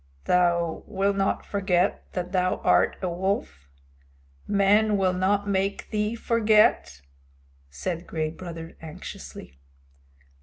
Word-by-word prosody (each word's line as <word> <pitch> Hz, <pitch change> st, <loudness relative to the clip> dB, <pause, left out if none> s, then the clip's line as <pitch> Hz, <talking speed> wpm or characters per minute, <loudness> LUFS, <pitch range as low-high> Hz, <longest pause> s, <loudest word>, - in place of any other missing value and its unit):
"Thou 170 Hz, -2 st, +2 dB
wilt 200 Hz, 0 st, 0 dB
not 195 Hz, 0 st, 0 dB
forget 190 Hz, -2 st, 0 dB
that 180 Hz, -1 st, -4 dB
thou 185 Hz, -1 st, +1 dB
art -, -, +3 dB
a -, -, +1 dB
wolf? 175 Hz, -, -3 dB, 0.8 s
Men 205 Hz, +1 st, +3 dB
will 185 Hz, -2 st, +2 dB
not 200 Hz, +2 st, +1 dB
make 195 Hz, 0 st, -1 dB
thee 210 Hz, +1 st, -1 dB
forget?" 215 Hz, -, +2 dB, 0.7 s
said 165 Hz, -, -5 dB
Gray 155 Hz, -1 st, -2 dB
Brother 165 Hz, -1 st, -9 dB
anxiously. 155 Hz, -, -10 dB
185 Hz, 110 wpm, -25 LUFS, 170-200 Hz, 0.8 s, art